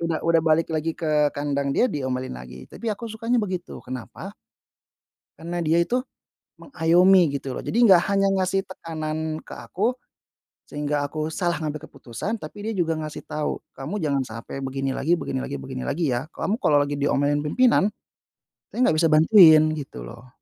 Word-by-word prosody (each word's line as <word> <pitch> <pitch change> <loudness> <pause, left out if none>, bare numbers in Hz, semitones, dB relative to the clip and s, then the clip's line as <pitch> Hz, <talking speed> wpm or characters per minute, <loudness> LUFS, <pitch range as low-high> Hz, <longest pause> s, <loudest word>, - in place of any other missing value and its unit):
Udah 165 -1 -1
udah 165 0 +4
balik 160 +1 +2
lagi 160 +1 -2
ke 150 -2 +2
kandang 140 -1 -1
dia - - +3
diomelin 130 -3 -3
lagi. 65 +1 -10
Tapi 235 - -6
aku 230 +3 -5
sukanya 230 +2 -1
begitu, 185 -5 -3
kenapa? 125 -5 -8 1.0
Karena 170 +2 -5
dia 165 +1 +2
itu 245 +9 0 0.6
mengayomi 175 - +4
gitu 135 -2 -4
loh, - - -5
jadi - - -4
enggak 190 -7 +7
hanya 195 0 +3
ngasih 190 +1 +1
tekanan 155 -2 -4
ke - - -19
aku, 230 +7 -2 0.7
sehingga 145 0 -2
aku 155 +2 -4
salah 175 0 -1
ngambil 150 -1 -5
keputusan, 130 - -5
tapi 205 +3 -8
dia 225 - -1
juga 165 -3 +1
ngasih 155 -1 -6
tahu, 150 0 -4
kamu 135 +9 -6
jangan 140 -3 +1
sampai 115 +4 -7
begini 135 0 -3
lagi 165 +6 +1
begini 135 -5 -3
lagi 70 - -4
begini 65 -1 -6
lagi, 155 -3 0
ya. 125 +5 -2
Kamu 215 +8 -2
kalau 150 - +2
lagi 145 0 -4
diomelin 145 +1 +1
pimpinan, 210 +5 +3 0.8
saya - - -10
enggak 155 - +3
bisa 165 - +4
bantuin 160 0 +7
gitu 130 - -7
loh. 120 - -11
155 Hz, 170 wpm, -24 LUFS, 140-180 Hz, 1.0 s, enggak